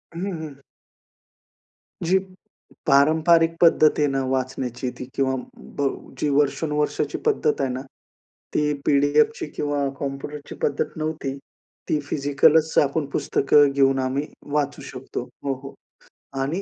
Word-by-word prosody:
हं, 170 - -5
हं, 170 - -4
हं. 140 -2 -13 1.5
जी 185 +3 +4 0.7
पारंपरिक 160 +4 +4
पद्धत 160 -2 +6
आहे 150 - +3
ना 135 -1 0
वाचण्याची 130 -1 -2
ती 125 - -5
किंवा 130 -1 +1 0.4
ब 140 -1 +2 0.3
जी 150 - +1
वर्षानुवर्षाची 150 +1 0
पद्धत 420 - +1
आहे 135 - 0
ना 130 - -4 0.7
ती 150 0 +1
पी-डी-एफची 145 +2 +3
किंवा 145 -1 -1
कॉम्प्युटरची 140 +1 -6
पद्धत 140 - +1
नव्हती. 155 -3 -3 0.6
ती 150 - +2
फिजिकलच 145 +2 +2
आपण 145 +1 -1
पुस्तकं 145 +1 +3
घेऊन 135 -1 +3
आम्ही 130 +3 -1 0.3
वाचू 145 -1 0
शकतो. 125 -2 -6 0.2
हो, 140 - 0
हो. 135 - -8 0.7
आणि 155 +8 -1
145 Hz, 125 wpm, -23 LUFS, 135-150 Hz, 1.5 s, पद्धत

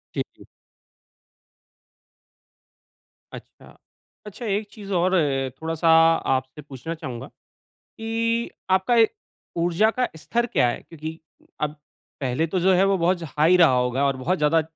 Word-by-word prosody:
जी, - - 0 0.2
जी। - - -15 2.9
अच्छा। - - -13 0.5
अच्छा, 210 +3 -8
एक 205 +1 -1
चीज़ 200 -2 -10
और 185 +2 +2
है 135 -5 +1
थोड़ा-सा 160 +5 -3 0.5
आपसे 130 +3 -5
पूछना 140 +3 -7
चाहूँगा 125 -6 -7 0.5
कि 230 +1 -2 0.2
आपका, 190 +6 +3
ए 225 -1 +6 0.5
ऊर्जा 175 +6 +2
का 250 +1 -1
स्तर 235 +9 -1
क्या 125 - +2
है? - - -3
क्योंकि 160 0 -8 0.4
अब 150 0 -2 0.4
पहले 135 +5 0
तो 185 +3 -2
जो 190 +2 +4
है 190 +2 +4
वो 195 0 +2
बहुत 175 +2 +2
ज 165 - -7
हाई 165 +4 +5
रहा 165 -5 +6
होगा 125 +2 +1
और 135 -1 0
बहुत 175 +9 -1
ज़्यादा 155 +2 +3
165 Hz, 140 wpm, -24 LUFS, 145-195 Hz, 2.9 s, ए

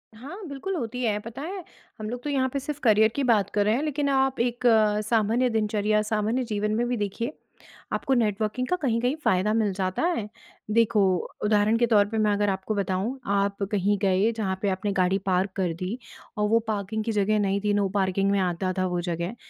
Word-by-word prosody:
हाँ, 270 +10 -9
बिल्कुल 295 +7 -4
होती 250 -4 -4
है, 215 -3 +1
पता 230 +5 -8
है 370 +4 -5 0.4
हम 215 0 -4
लोग 245 +1 -5
तो 295 - -3
यहाँ 265 -2 +1
पे 280 - 0
सिर्फ़ 295 +1 -5
करियर 220 -2 +5
की 280 - 0
बात 215 -6 +3
कर 205 0 +1
रहे 215 +2 +3
हैं। 275 - -1
लेकिन 295 -1 -1
आप 265 -1 +1
एक 240 +1 -1 0.5
सामान्य 230 +3 +2
दिनचर्या, 215 -1 +1
सामान्य 215 +4 0
जीवन 210 -2 -2
में 240 +2 0
भी 245 - -1
देखिए, 220 +6 -3 0.6
आपको 270 - 0
नेटवर्किंग 220 +1 0
का 360 - +1
कहीं-कहीं 245 0 +1
फ़ायदा 190 0 +2
मिल 220 -2 +1
जाता 185 +3 -2
है। 210 - -3 0.4
देखो 225 -1 +3 0.4
उदाहरण 210 +1 +3
के 240 - +3
तौर 210 -3 +4
पे 225 - -3
मैं 215 -1 +2
अगर 205 0 +1
आपको 190 +2 -2
बताऊँ। 200 +6 -2
आप 200 0 0
कहीं 205 0 +1
गए 195 +2 +3
जहाँ 195 -4 -1
पे 200 - +1
आपने 190 +2 -1
गाड़ी 185 0 +2
पार्क 190 +1 +1
कर 185 -4 0
दी 190 +6 -3 0.4
और 210 0 +1
वो 230 +1 +4
पार्किंग 215 0 -2
की 225 - -2
जगह 210 0 +1
नहीं 200 -1 +1
थी 210 0 +1
नो 205 -1 +2
पार्किंग 195 0 +1
में 200 - +2
आता 185 0 -1
था 185 - +1
वो 175 -1 -1
जगह। 175 +4 -3
215 Hz, 210 wpm, -26 LUFS, 200-240 Hz, 0.6 s, करियर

